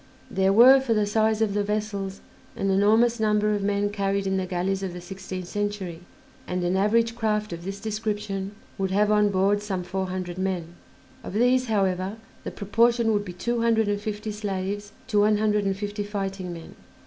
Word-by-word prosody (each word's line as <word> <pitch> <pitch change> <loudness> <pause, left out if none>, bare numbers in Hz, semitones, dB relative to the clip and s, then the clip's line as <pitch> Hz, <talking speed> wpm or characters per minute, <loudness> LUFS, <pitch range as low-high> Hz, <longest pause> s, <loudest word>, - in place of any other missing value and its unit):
There 190 0 +2
were, 250 +6 +8
for 240 -4 0
the 210 -1 +2
size 220 +1 +2
of 205 -2 0
the 205 0 +1
vessels, 205 -2 -3 0.3
an 195 0 0
enormous 220 +4 +3
number 210 -1 +2
of 205 - -1
men 205 0 0
carried 200 -1 -1
in 190 0 0
the 185 -1 -2
galleys 185 +2 -1
of 190 -2 -4
the 180 - -6
sixteenth 185 0 -7
century, 205 -4 -3 0.5
and 180 0 -2
an 175 +1 +1
average 225 +4 +2
craft 215 -3 -1
of 170 0 -7
this 195 +2 -5
description 210 -2 -3 0.2
would 190 -1 0
have 205 +2 +2
on 210 -1 +4
board 200 +1 +2
some 195 -3 -3
four 190 +1 -3
hundred 185 -1 -4
men; 180 -3 -2 0.5
of - - -7
these, 250 +3 +3
however, 195 -1 0 0.3
the - - -4
proportion 230 +2 +2
would 205 -1 +1
be 180 -3 -7
two 235 +6 -1
hundred 225 -2 +3
and 205 0 -1
fifty 215 0 -4
slaves 205 0 -4
to 210 -5 +1
one 210 +1 +4
hundred 210 -1 +1
and 195 -1 0
fifty 205 0 -3
fighting 195 -3 -4
men. 165 -1 -9
205 Hz, 195 wpm, -25 LUFS, 190-215 Hz, 0.5 s, were